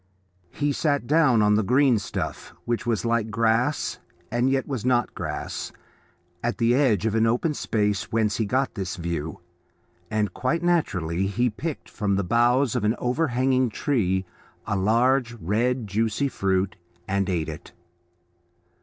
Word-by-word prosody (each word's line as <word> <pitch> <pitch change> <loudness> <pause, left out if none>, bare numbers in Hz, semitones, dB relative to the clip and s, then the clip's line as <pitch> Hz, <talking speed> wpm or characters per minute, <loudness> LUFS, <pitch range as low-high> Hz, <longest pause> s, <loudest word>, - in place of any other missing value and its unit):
He 145 +7 -1
sat 145 -2 0
down 135 -6 +4
on 105 0 +4
the 105 - +3
green 125 +1 +3
stuff 95 - -5
which 120 0 -2
was 115 -1 0
like 115 -1 +1
grass 115 +6 +1 0.3
and 120 +2 +2
yet 135 -1 0
was 130 -6 -3
not 125 -1 +1
grass, - - -5 0.7
at 120 0 -1
the 115 0 +3
edge 125 -8 +2
of 110 - +1
the 110 0 +2
open 125 +7 +1
space 105 -7 -1
whence 110 -2 +1
he 110 - 0
got 130 +4 0
this 95 -4 -4
view, 85 -3 -4 0.7
and 105 -4 -1
quite 165 +7 -1
naturally 95 - +1
he 120 +4 0
picked 155 +8 -5
from 100 -2 -1
the 100 - 0
boughs 120 +5 +2
of - - 0
an 105 +2 +2
overhanging 130 -1 +1
tree 95 -7 0 0.4
a 105 - -1
large 120 +5 +2
red, 115 +6 0
juicy 110 +7 0
fruit, 95 -1 0 0.3
and 100 0 0
ate 85 -4 -1
it. 80 -1 -8
115 Hz, 155 wpm, -25 LUFS, 100-130 Hz, 0.7 s, down